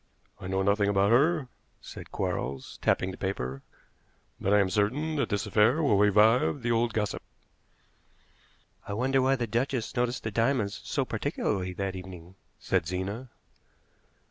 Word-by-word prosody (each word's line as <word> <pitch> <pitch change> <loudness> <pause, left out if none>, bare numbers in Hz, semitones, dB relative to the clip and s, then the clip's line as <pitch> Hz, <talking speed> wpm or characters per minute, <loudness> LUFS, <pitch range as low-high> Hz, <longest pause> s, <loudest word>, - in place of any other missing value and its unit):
"I 90 - -7
know 95 +1 0
nothing 100 +1 +2
about 100 +1 +3
her," 145 +3 +3 0.3
said - - -11
Quarles, 65 0 -4
tapping 95 - +1
the - - -10
paper; 70 -9 -3 0.8
"but 100 - -1
I 105 - +6
am 100 -2 +2
certain 130 - 0
that 140 - 0
this 100 -1 -1
affair 110 +9 +3
will 135 -8 +3
revive 110 +6 +4
the 120 - 0
old 115 0 +2
gossip." 105 -2 -2 1.7
"I 100 - -4
wonder 130 +5 +1
why 135 +1 +3
the 120 -2 -2
duchess 120 +2 -2
noticed 125 0 -1
the 110 - -3
diamonds 115 -2 0
so - - -1
particularly 90 -1 -2
that 95 +1 -3
evening," 90 -1 -10 0.3
said 90 -4 0
Zena. 100 +8 -4
105 Hz, 150 wpm, -28 LUFS, 95-125 Hz, 1.7 s, I